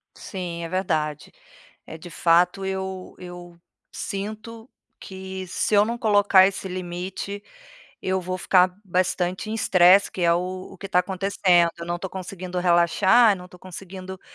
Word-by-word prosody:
Sim, 175 -4 -6
é 165 - -5
verdade. 155 -5 -2 0.6
É 160 - -9
de 175 +1 -11
fato 175 +4 +2
eu 190 -1 -5
eu 175 -1 -11 0.3
sinto 215 +4 -6 0.3
que 190 0 -7
se 210 - -1
eu 205 0 +6
não 235 +2 -3
colocar 205 -3 +5
esse 190 0 -3
limite 185 +2 -5 0.6
eu 190 0 0
vou 185 +1 -4
ficar 185 0 +3
bastante 185 +1 -1
em - - -2
estresse 190 -2 +5
que 185 - -6
é, 170 -1 +4
o 185 +1 -4
o - - -12
que 195 - -7
tá 180 - +2
acontecendo, 180 -2 +2
eu 170 - -7
não 175 0 -2
tô 190 0 -6
conseguindo 185 -1 -6
relaxar, 180 +6 +4
eu - - -2
não 180 0 -11
tô 180 - -16
conseguindo, 185 +1 -9
185 Hz, 160 wpm, -24 LUFS, 175-195 Hz, 0.6 s, eu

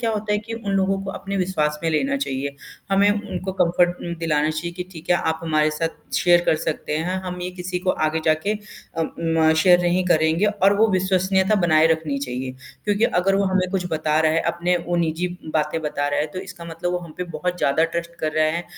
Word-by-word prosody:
क्या 230 -1 0
होता 210 -1 -2
है 210 - +2
कि 220 +2 -8
उन 220 -3 -4
लोगों 195 0 +1
को 195 - -3
अपने 195 0 -5
विश्वास 155 -5 0
में 165 - +1
लेना 270 - +1
चाहिये, 140 - -3 0.4
हमें 200 +1 +4
उनको 205 -2 -3
कम्फ़र्ट 175 +1 +2 0.2
उ - - -2
दिलाना 155 -2 +1
चाहिए 165 +2 -4
कि 180 - -4
ठीक 165 +1 -9
है, 175 - +6
आप 160 -1 -1
हमारे 155 -1 +2
साथ 165 +2 -5
शेयर 175 -1 +5
कर - - +4
सकते 155 -1 -3
हैं, 180 +4 -1
हम 180 -1 -5
ये 180 - -3
किसी 180 0 -4
को 185 +1 0 0.2
आगे 160 +1 -1
जाके 155 +6 +2
अ, 210 -5 -7 0.2
म 165 -1 +3
शेयर 180 -1 +6
नहीं 175 +1 +1
करेंगे 160 +3 +3
और 200 -1 +3
वो 225 - +5
विश्वसनीयता 190 +1 +2
बनाए 155 -1 +5
रखनी 155 -3 -2
चाहिए 130 -1 -4 0.3
क्योंकि 205 +1 +2
अगर 190 0 +2
वो 200 0 +2
हमें 190 -1 +1
कुछ 185 -2 -1
बता 155 -1 +1
रहा 155 -1 +3
है, 165 - +2
अपनी 175 +2 0
वो 175 0 0
निजी 170 +1 0 0.3
बातें 155 +1 0
बता 145 -1 -1
रहा 145 - 0
है, 150 - 0
तो 155 +4 -8
इसका 180 -2 -9
मतलब 170 +2 -3
वो 180 - 0
हम 170 -3 -10
पे 180 - -3
बहुत 180 +1 -3
ज़्यादा 155 +2 +2
ट्रस्ट 170 +1 -4
कर 155 -1 -1
रहा 155 0 +3
है 170 +3 -1
175 Hz, 230 wpm, -22 LUFS, 155-190 Hz, 0.4 s, है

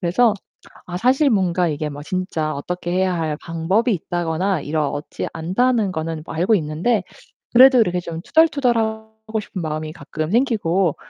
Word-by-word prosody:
그래서 205 +6 +3 0.5
아 175 - -5
사실 260 - +3
뭔가 185 -4 +2
이게 150 0 -2
뭐 145 0 -8
진짜 165 -4 -2
어떻게 175 +4 -4
해야 185 0 +1
할 155 -2 -1
방법이 185 +9 0
있다거나 175 +1 -1
이렇지 150 -1 -3
않다는 205 +6 +1
거는 160 -1 -4
뭐 - - -7
알고 180 +7 +2
있는데 170 +7 0 0.5
그래도 255 +1 +8
이렇게 180 -5 +2
좀 170 -1 -6
투덜투덜 280 -6 +3
하고 220 0 -4
싶은 195 -3 -6
마음이 155 -1 -4
가끔 155 +1 -5
생기고. 195 - +1
180 Hz, 340 characters per minute, -21 LUFS, 160-220 Hz, 0.5 s, 그래도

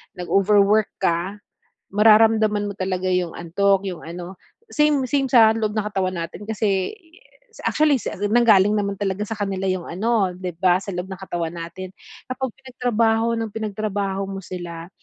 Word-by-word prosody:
nag-overwork 200 +3 +3
ka, 175 +2 -1 0.5
mararamdaman 215 0 +4
mo 200 - -7
talaga 185 -1 -2
yung 180 -2 0
antok, 195 +3 +1
yung 180 -3 -7
ano, 175 +3 -8 0.3
same 300 - +2
same 275 +2 +1
sa 225 -3 +6
loob 215 -2 -1
ng 210 -1 -1
katawan 190 -3 -1
natin, 165 +4 -7
kasi, 205 -3 -1
yes, 410 +7 -20
actually 300 -2 +3
si 250 - -4 0.2
nanggaling 215 -3 +5
naman 200 -1 0
talaga 200 0 -1
sa 215 0 -6
kanila 195 -1 -2
yung 185 -2 -2
ano, 195 -1 0
di 180 -1 -5
ba, 175 +2 +3
sa 195 +1 -5
loob 180 +1 -4
ng 190 - -6
katawan 175 -3 -4
natin. 170 +3 -7 0.4
Kapag 255 -1 -3
pinagtrabaho 230 -2 +1
ng 225 -1 -3
pinagtrabaho 200 -2 -2
mo 195 -1 -6
sila, 175 -2 -7
200 Hz, 160 wpm, -22 LUFS, 185-220 Hz, 0.5 s, sa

